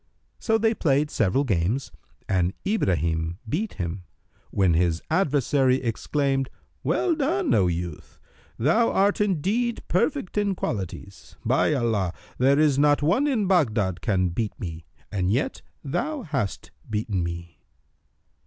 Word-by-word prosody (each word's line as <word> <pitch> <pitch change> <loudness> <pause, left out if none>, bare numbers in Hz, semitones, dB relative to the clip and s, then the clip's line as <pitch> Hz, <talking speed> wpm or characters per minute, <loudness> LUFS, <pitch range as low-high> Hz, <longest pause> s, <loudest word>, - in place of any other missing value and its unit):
So 225 -1 +2
they 225 +1 +2
played 150 -6 +1
several 115 +6 +2
games 105 +2 0 0.4
and 90 -1 +1
Ibrahim 85 - 0
beat 185 - -2
him, 90 +1 -4 0.4
when 95 -4 +2
his 85 0 +2
adversary 140 -6 +3
exclaimed, 135 +2 -1 0.3
"Well 360 - +1
done, 325 +2 +1
O 95 - +4
youth! 85 -2 -5 0.4
Thou 170 - +3
art 200 +2 +2
indeed 210 +6 0
perfect 210 - 0
in 200 -2 0
qualities. 100 - -5
By 150 - +3
Allah, 110 -8 0 0.2
there 135 +2 +4
is 145 -3 +3
not 145 0 +4
one 205 - +3
in 235 -8 +1
Baghdad 110 - +1
can 95 -5 +1
beat 105 +5 -3
me, 80 -3 -6 0.3
and 95 -3 0
yet 120 +8 0 0.2
thou 265 - -2
hast 135 - -3 0.2
beaten 105 -3 -1
me!" 85 0 -6
130 Hz, 130 wpm, -25 LUFS, -, 0.4 s, O